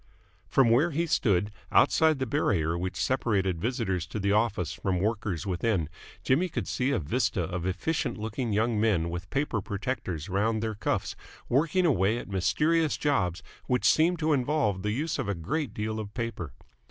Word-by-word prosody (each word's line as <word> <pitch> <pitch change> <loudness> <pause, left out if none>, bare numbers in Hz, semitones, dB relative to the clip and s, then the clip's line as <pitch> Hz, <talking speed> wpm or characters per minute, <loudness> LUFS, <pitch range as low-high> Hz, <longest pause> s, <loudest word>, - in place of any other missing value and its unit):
From 130 -4 +4
where 140 +9 +4
he 165 +2 0
stood, 105 - +1 0.2
outside 160 -2 +4
the 130 - -1
barrier 95 - +1
which 90 +2 -3
separated 95 -9 0
visitors 95 -7 -1
to 110 - -5
the 100 0 +1
office 100 -6 +1
from 95 0 -1
the 90 - -1
workers 105 -5 -1
within, 95 -3 0 0.3
Jimmy 165 +8 +2
could 170 - -3
see 125 +2 0
a 140 - +1
vista 75 -8 0
of 90 -1 -3
efficient 150 - -1
looking 110 +2 -3
young 110 +1 +1
men 90 -7 +1
with 85 +2 -6
paper 135 -6 -1
protectors 100 - -4
round 110 +3 0
their 110 -1 -1
cuffs 105 - -2 0.3
working 165 +7 +2
away 110 - +2
at - - -6
mysterious 150 - +1
jobs 100 - 0 0.2
which 125 -1 +1
seemed 170 +3 +4
to 155 -1 +1
involve 125 -8 +1
the 105 - -1
use 145 +8 -1
of 120 -7 -2
a 100 - 0
great 135 - -2
deal 110 +1 -3
of 105 -2 -6
paper. 115 - -4
110 Hz, 180 wpm, -28 LUFS, 95-135 Hz, 0.3 s, From